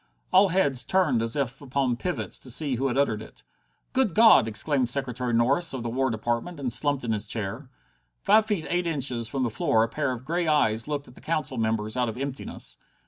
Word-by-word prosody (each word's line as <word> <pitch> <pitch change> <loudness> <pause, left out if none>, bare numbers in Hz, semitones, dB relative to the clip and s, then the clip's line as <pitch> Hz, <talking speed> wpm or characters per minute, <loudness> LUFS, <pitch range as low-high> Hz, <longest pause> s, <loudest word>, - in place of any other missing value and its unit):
All 195 +2 +7
heads 155 -9 +2
turned 165 -11 +2
as 115 0 -1
if 135 -1 -2
upon 135 -2 -1
pivots 180 +8 -4
to 130 - -10
see 140 +3 +1
who 130 +3 0
had 130 - -2
uttered 110 -7 +1
it. 110 - -14 0.5
"Good 260 -9 +1
God!" 220 - +7
exclaimed 125 +3 +1
Secretary 125 -2 -1
Norris, 135 +9 +2
of 125 - -5
the 120 - -3
War 130 +2 0
Department, 120 +8 -3
and 125 -4 0
slumped 145 -1 +1
in 115 - -2
his 105 -1 -2
chair. 110 +5 -5 0.5
Five 220 0 +4
feet 200 -7 -1
eight 175 0 -1
inches 130 -7 -1
from 130 +3 -2
the 120 - -1
floor 110 +1 +2
a - - 0
pair 140 +3 -2
of 125 0 -6
grey 170 +3 -1
eyes 115 -7 +2
looked 145 -1 -3
at 125 - -15
the - - -16
Council 155 -5 -2
members 110 0 -1
out 125 -2 0
of 110 - -7
emptiness. 135 0 -5
130 Hz, 215 wpm, -26 LUFS, 115-150 Hz, 0.5 s, All